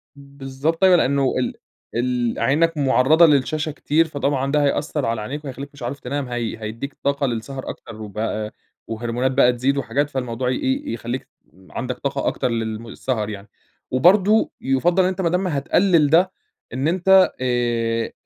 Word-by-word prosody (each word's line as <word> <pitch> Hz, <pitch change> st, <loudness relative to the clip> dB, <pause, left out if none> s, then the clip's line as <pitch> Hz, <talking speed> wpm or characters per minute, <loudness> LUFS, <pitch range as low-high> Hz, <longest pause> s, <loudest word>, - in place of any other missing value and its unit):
بالضبط 140 Hz, +4 st, -4 dB
أيوه، 185 Hz, -1 st, +7 dB
لإنه 140 Hz, -4 st, +2 dB
ال 125 Hz, -, -1 dB, 0.4 s
ال 120 Hz, -1 st, 0 dB
عينك 155 Hz, +7 st, +2 dB
معرّضة 140 Hz, +4 st, +5 dB
للشاشة 155 Hz, +2 st, +1 dB
كتير، 155 Hz, +2 st, +1 dB
فطبعًا 140 Hz, -2 st, -1 dB
ده 150 Hz, 0 st, +2 dB
هيأثّر 145 Hz, 0 st, 0 dB
على 115 Hz, -1 st, -1 dB
عينيك 145 Hz, +7 st, -6 dB
ويخلّيك 140 Hz, +1 st, -7 dB
مش 140 Hz, -, -11 dB
عارف 130 Hz, +4 st, -4 dB
تنام 140 Hz, 0 st, -3 dB
هي 120 Hz, -2 st, -3 dB
هيدّيك 115 Hz, +6 st, -5 dB
طاقة 140 Hz, 0 st, +1 dB
للسهر 130 Hz, +3 st, -5 dB
أكتر، 110 Hz, -, -9 dB
وبقى 105 Hz, +1 st, -4 dB, 0.3 s
وهرمونات 120 Hz, +3 st, -2 dB
بقى 130 Hz, -2 st, +4 dB
تزيد 130 Hz, +3 st, 0 dB
وحاجات 145 Hz, +1 st, -1 dB
فالموضوع 125 Hz, -2 st, -2 dB
ي -, -, +1 dB
إيه، 280 Hz, +2 st, -2 dB
يخلّيك 120 Hz, +3 st, -5 dB, 0.4 s
عندك 125 Hz, 0 st, -4 dB
طاقة 140 Hz, 0 st, -2 dB
أكتر -, -, 0 dB
للم 115 Hz, -1 st, -4 dB
سهر 110 Hz, -5 st, -2 dB
يعني، 100 Hz, 0 st, -8 dB, 0.4 s
وبرضه 195 Hz, +10 st, +4 dB
يُفضّل 170 Hz, +8 st, +2 dB
إن 185 Hz, -, +2 dB
أنت 190 Hz, 0 st, -3 dB
ما 170 Hz, -, +1 dB
دام 180 Hz, +2 st, 0 dB
هتقلّل 160 Hz, +1 st, +2 dB
ده، 180 Hz, +4 st, +4 dB, 0.4 s
إن 135 Hz, +4 st, -1 dB
أنت 190 Hz, +2 st, +5 dB
آآ 120 Hz, -2 st, 0 dB
135 Hz, 160 wpm, -21 LUFS, 120-155 Hz, 0.4 s, أيوه